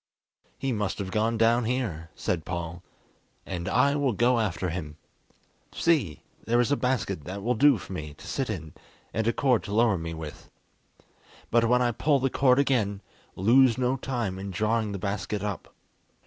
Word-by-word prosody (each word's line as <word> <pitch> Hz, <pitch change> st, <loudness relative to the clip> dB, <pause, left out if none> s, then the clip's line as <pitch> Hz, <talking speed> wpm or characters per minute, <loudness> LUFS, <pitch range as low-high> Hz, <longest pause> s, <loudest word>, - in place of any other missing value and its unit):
"He 135 Hz, 0 st, -2 dB
must 105 Hz, -4 st, -1 dB
have 95 Hz, -2 st, -4 dB
gone 110 Hz, +2 st, +1 dB
down 115 Hz, +1 st, +3 dB
here," 110 Hz, -10 st, -2 dB
said 80 Hz, -3 st, -2 dB
Paul, 85 Hz, 0 st, -5 dB, 0.6 s
"and 90 Hz, 0 st, -4 dB
I 140 Hz, +5 st, +3 dB
will 140 Hz, -4 st, +1 dB
go 120 Hz, +3 st, +3 dB
after 90 Hz, -4 st, -1 dB
him. 75 Hz, -4 st, -6 dB, 0.8 s
See! 145 Hz, -, +1 dB, 0.2 s
there 120 Hz, +1 st, +2 dB
is 120 Hz, +3 st, +2 dB
a -, -, +4 dB
basket 125 Hz, -, -1 dB
that 95 Hz, +2 st, -6 dB
will 120 Hz, +3 st, +2 dB
do 140 Hz, +2 st, +5 dB
for 95 Hz, -, -9 dB
me 75 Hz, -4 st, -6 dB
to -, -, -14 dB
sit 135 Hz, -3 st, -2 dB
in, 80 Hz, -7 st, -5 dB, 0.4 s
and 110 Hz, 0 st, -1 dB
a -, -, +4 dB
cord 125 Hz, -4 st, +2 dB
to 100 Hz, -, -4 dB
lower 110 Hz, -5 st, +3 dB
me 80 Hz, 0 st, -5 dB
with. 80 Hz, -2 st, -9 dB, 1.0 s
But 115 Hz, 0 st, +4 dB
when 125 Hz, 0 st, +4 dB
I 120 Hz, -, +2 dB
pull 140 Hz, +5 st, +2 dB
the 135 Hz, -1 st, 0 dB
cord 130 Hz, -2 st, +4 dB
again, 110 Hz, -8 st, +1 dB, 0.3 s
lose 120 Hz, +5 st, +5 dB
no 130 Hz, 0 st, +1 dB
time 120 Hz, -8 st, -3 dB
in 100 Hz, +1 st, -5 dB
drawing 110 Hz, +3 st, 0 dB
the 100 Hz, -, -3 dB
basket 100 Hz, +1 st, -3 dB
up." 105 Hz, -2 st, -4 dB
110 Hz, 180 wpm, -27 LUFS, 95-125 Hz, 1.0 s, do